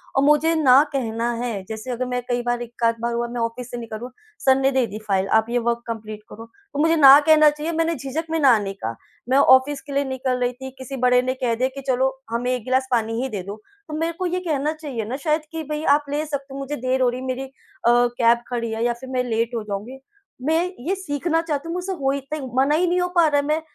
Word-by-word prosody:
और 270 - +3
मुझे 300 +3 +4
ना 275 -3 +6
कहना 235 -3 -1
है 220 -6 -3
जैसे 220 +3 -5
अगर 250 +1 -2
मैं 250 0 -2
कई 245 0 0
बार 240 0 0
एक-आध 235 -1 -1
बार 235 0 -1
हुआ 235 0 -1
मैं 240 0 -4
ऑफ़िस 230 +2 -3
से 245 - -5
निकलूँ, 230 +1 -7 0.4
सर 265 -1 +6
ने 270 0 +2
दे 260 -2 +2
दी 210 +1 -7
फ़ाइल 195 -1 +1
आप 220 - +2
ये 245 - 0
वर्क 235 0 -1
कंप्लीट 215 -2 -6
करो, 225 +1 -10 0.3
तो 285 - -3
मुझे 325 +2 +4
ना 280 -2 +9
कहना 305 0 +6
चाहिए 300 +2 -4
मैंने 330 0 0
झिझक 275 +4 -4
में 325 0 0
ना 265 -6 +6
नहीं 195 -1 -4
का। 115 +1 -3 0.3
मैं 265 - +4
ऑफ़िस 275 +1 +5
के 285 - -9
लिए 280 +1 +2
निकल 260 -1 -2
रही 245 0 0
थी, 265 +1 -8
किसी 260 +1 -7
बड़े 250 0 +4
ने 255 0 -1
कह 250 -3 -1
दिया 255 +3 +1
कि 275 - -6
चलो 260 0 +2 0.2
हमें 240 +2 -1
एक 250 -3 -3
गिलास 260 +1 +1
पानी 225 -1 0
ही 265 - -2
दे 205 -6 -4
दो, 200 +2 -6 0.3
तो 310 - -8
मेरे 330 +1 -1
को 370 - -1
ये 360 +1 -1
कहना 305 -4 -1
चाहिए 285 -8 -5
ना 245 +5 -4
शायद 305 +2 0
कि 325 -1 -4
भई 300 0 -3
आप 295 0 -2
ले 295 +2 -1
सकते 280 -2 -5
हो, 275 - -6
मुझे 275 +2 -4
देर 255 0 -1
हो 250 - +4
रही 245 +1 -4
है, - - -6
मेरी 260 +1 -2
अ, 270 - -9 0.4
कैब 240 -1 +3
खड़ी 235 -2 -2
है 225 +1 -2
या 240 0 +2
फ़िर 255 +2 -11
मैं 250 -1 +1
लेट 230 +1 -1
हो 225 - -2
जाऊँगी। 210 +6 -6 0.5
मैं 320 +2 +2 0.3
ये 385 - +1
सीखना 325 -2 -1
चाहती 315 -2 -3
हूँ, 335 - -3
मुझसे 360 +2 -3
हो 270 -1 +1
ही 280 - -1
तइ 310 - -2 0.2
मना 275 +3 +3
ही 355 +3 +2
नहीं 355 +1 +1
हो 360 - +1
पा 340 -2 +5
रहा 290 -1 +2
है, - - -7
मैं 305 +1 +1
260 Hz, 270 wpm, -22 LUFS, 235-295 Hz, 0.5 s, ना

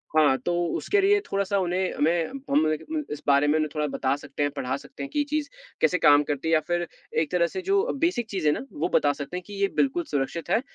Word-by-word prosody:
हाँ, 145 -4 +5
तो 175 - -2 0.2
उसके 405 - +1
लिए 410 +1 +4
थोड़ा-सा 200 - -1
उन्हें 185 +1 -1
हमें 165 +2 +1 0.2
हम 150 +3 +3
देंखे 155 -1 -2
उन 305 - -1
इस 150 - -5
बारे 140 +1 +4
में 150 - +3
उन्हें 155 -1 0
थोड़ा 150 -1 0
बता 135 0 0
सकते 145 0 -4
हैं, 145 - 0
पढ़ा 130 -2 -3
सकते 270 - -10
हैं 280 - -5
कि 295 - -1
ये 290 - +2
चीज़ 300 -1 -1 0.3
कैसे 180 - +3
काम 145 -3 +6
करती 145 +2 -3
है 165 - +2
या 155 - +6
फिर 175 0 0 0.3
एक 155 - -3
तरह 175 -1 +2
से 375 - -5
जो 395 +3 +2 0.2
बेसिक 240 -10 -1
चीज़ 185 -6 -1
है 150 - +5
ना 270 - -5
वो 295 - -2
बता 145 -1 +3
सकते 145 +5 -6
हैं 180 - -6
कि 205 - -9
ये 200 - +4
बिल्कुल 285 +6 +2
सुरक्षित 145 +4 -2
है 225 - +3
170 Hz, 260 wpm, -26 LUFS, 145-240 Hz, 0.3 s, काम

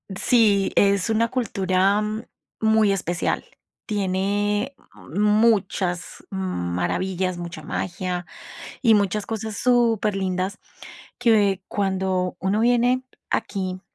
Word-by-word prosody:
Sí, 205 -3 +3
es 200 +1 +3
una 230 +1 +2
cultura 195 -4 +1 0.6
muy 220 -2 +3
especial, 175 -2 -1 0.4
tiene 205 +3 -1 0.3
muchas 205 -2 +1
maravillas, 185 - -2
mucha 170 -1 -7
magia 180 0 -3 0.6
y 225 -4 +5
muchas 200 0 0
cosas 220 -1 -4
superlindas 205 -5 +1 0.6
que 200 -5 +3
cuando 190 -2 -1
uno 195 +3 0
viene 245 +2 +3 0.3
aquí, 185 -2 -2
200 Hz, 85 wpm, -23 LUFS, 185-220 Hz, 0.6 s, y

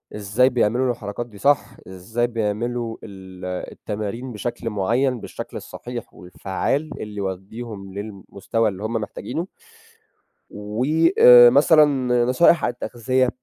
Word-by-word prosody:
إزاي 105 +5 +2
بيعملوا 125 +1 +1
الحركات 105 +1 -5
دي 105 -4 -15
صح، 140 +5 +2 0.2
إزاي 105 +6 -2
بيعملوا 115 +1 -3
ال 95 -2 -10 0.3
التمارين 110 +5 -5
بشكل 115 +2 -4
معيّن 120 +5 0
بالشكل - - -7
الصحيح 120 -1 -8
والفعّال 95 - -3
اللي 105 -1 -7
يودّيهم 95 +1 -6
للمستوى 100 +2 -3
اللي 95 +1 -8
هم 110 +2 -3
محتاجينه 155 - -4 1.0
و 105 +3 -4 0.4
آآ 120 -1 +10
مثلًا 150 +3 +6 0.4
نصائح 155 +6 +4
عن - - +1
التغذية، 125 +1 -1
115 Hz, 115 wpm, -22 LUFS, 100-125 Hz, 1.0 s, آآ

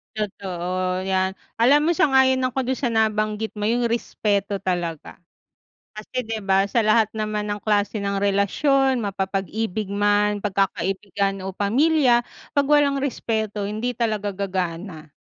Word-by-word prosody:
Totoo, 185 -3 -3
iyan, 190 0 +1 0.2
alam 285 +7 +4
mo 340 - +2
sang-ayon 265 -2 +4
ako 255 0 -1
dun 260 - +1
sa 245 -3 -1
nabanggit 215 0 0
mo 210 - -4
yung 235 +2 +1
respeto 205 -3 -1
talaga. 175 -4 -3 0.8
Kasi 235 +4 -5
di 220 0 -4
ba 195 0 +2
sa 230 +3 +1
lahat 215 0 +3
naman 215 -1 -2
ng 205 - -5
klase 205 0 0
ng 200 0 -1
relasyon 255 +8 +2
mapapag-ibig 195 +1 -3
man, 205 0 +2
pagkakaibigan 195 0 -1
o 190 - -4
pamilya, 245 - +3 0.3
pag 285 - +4
walang 290 -1 +3
respeto 220 -6 -2
hindi 225 +4 -2
talaga 215 -4 -1
gagana. 180 -4 -4
210 Hz, 135 wpm, -23 LUFS, 195-235 Hz, 0.8 s, alam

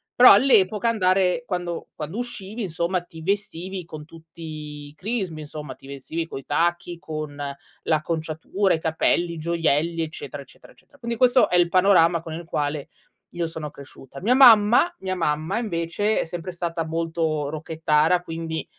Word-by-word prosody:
però 250 - +9
all'epoca, 210 -2 +4
andare 190 0 +2
quando 175 -2 -3
quando 160 +8 -5
uscivi 230 -2 -6
insomma, 175 -1 -1
ti 165 -2 -13
vestivi 190 -1 -3
con 155 -2 -9
tutti 165 +1 -14 0.4
i 145 - -14
crismi 185 -4 -3
insomma, 150 -1 -7
ti 135 - -17
vestivi 155 +4 -5
coi 135 -4 -8
tacchi, 170 +2 -1
con 155 -3 -6 0.5
l'acconciatura, 160 +4 0
i 160 - -5
capelli, 165 +1 0
gioielli; 165 0 0
eccetera, 160 0 -7
eccetera, - - -18
eccetera. 285 - -24
Quindi, 235 -2 -4
questo 250 +1 +4
è 180 - +3
il 175 -1 +4
panorama 180 -3 +4
con 165 -1 -8
il 170 +1 -7
quale 145 -2 -3 0.5
io 170 -1 -1
sono 160 -2 -6
cresciuta. 135 0 -12
Mia 225 +7 +3
mamma, 245 +6 +6
mia 185 -1 -3
mamma, 160 +4 -1
invece, 205 0 -1
è - - -1
sempre 175 +2 -6
stata 170 -2 -3
molto 160 -2 -1
rockettara, 160 +2 +1
quindi, 165 -1 -5
170 Hz, 155 wpm, -24 LUFS, 160-190 Hz, 0.5 s, però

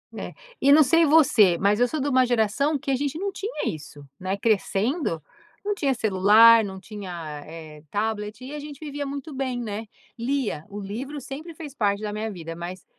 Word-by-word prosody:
É. - - -6 0.3
E 280 - +5
não 305 +2 +8
sei 330 +5 +4
você, 255 - +5
mas 200 +4 +2
eu 245 - +5
sou 310 +5 -3
de 280 - -1
uma 260 -2 +4
geração 245 +5 +1
que 280 - -6
a - - +3
gente 285 +3 -2
não 400 +2 -1
tinha 395 -3 -5
isso, 145 -2 -7
né? 190 +2 -2
Crescendo, 215 - 0 0.4
não 415 0 0
tinha 280 -8 +1
celular, 220 +1 +6
não 190 -2 -6
tinha, 175 -7 -7
eh, 155 -2 -11
tablet 210 0 -2
e 260 +3 -8
a 300 - -5
gente 290 -1 -9
vivia 290 -2 -5
muito 280 +2 -6
bem, 260 -2 -2
né? 220 -1 -4 0.3
Lia, 240 - -2
o 205 - -7
livro 245 +9 -5
sempre 290 +6 -8
fez 300 -3 -9
parte 200 -3 +1
da 210 -1 -3
minha 215 +1 -3
vida, 165 -3 -7
mas 175 +1 -7
230 Hz, 200 wpm, -25 LUFS, 200-280 Hz, 0.4 s, não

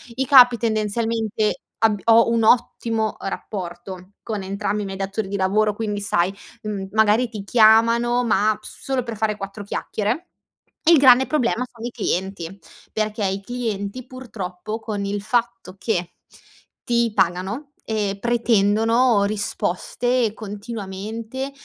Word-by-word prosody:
I 265 +2 0
capi, 245 -3 +7
tendenzialmente, 220 -1 -1 0.2
abb 215 -2 +3
ho 230 0 +6
un 230 -1 +2
ottimo, 225 -1 +2
uhm, - - -5
rapporto 185 -1 -7
con 215 -3 -4
entrambi 200 +2 -2
i - - -5
miei 195 0 -6
datori 195 +2 -3
di 200 - -4
lavoro. 205 +2 +2
Quindi, 210 -2 -3
sai, 190 -2 +1 0.3
mhmm, 205 -3 -4
magari, 220 +3 +3
ti 215 -3 -7
chiamano, 230 +3 +4
ma 215 -2 +2
p - - -32
solo 265 -2 -3
per 230 -1 -6
fare 215 0 0
4 200 +1 -7
chiacchiere. 220 - -3 0.6
Il 335 0 +7
grande 265 -1 +6
problema 250 -5 0
sono 235 -1 -9
i 240 - -4
clienti, 190 -5 -3 0.4
perché 215 -1 -1
i 195 +1 -1
clienti, 230 0 -4
purtroppo, 215 -5 -6
con 210 -3 -4
il 200 0 -2
fatto 235 -3 -2
che 180 -5 -2 0.7
ti 235 -1 +1
pagano, 190 - -1 0.2
ehm, 205 -2 -1
pretendono 230 0 +3
risposte 240 - -1
continuamente, 220 +4 -6
220 Hz, 135 wpm, -22 LUFS, 200-235 Hz, 0.7 s, capi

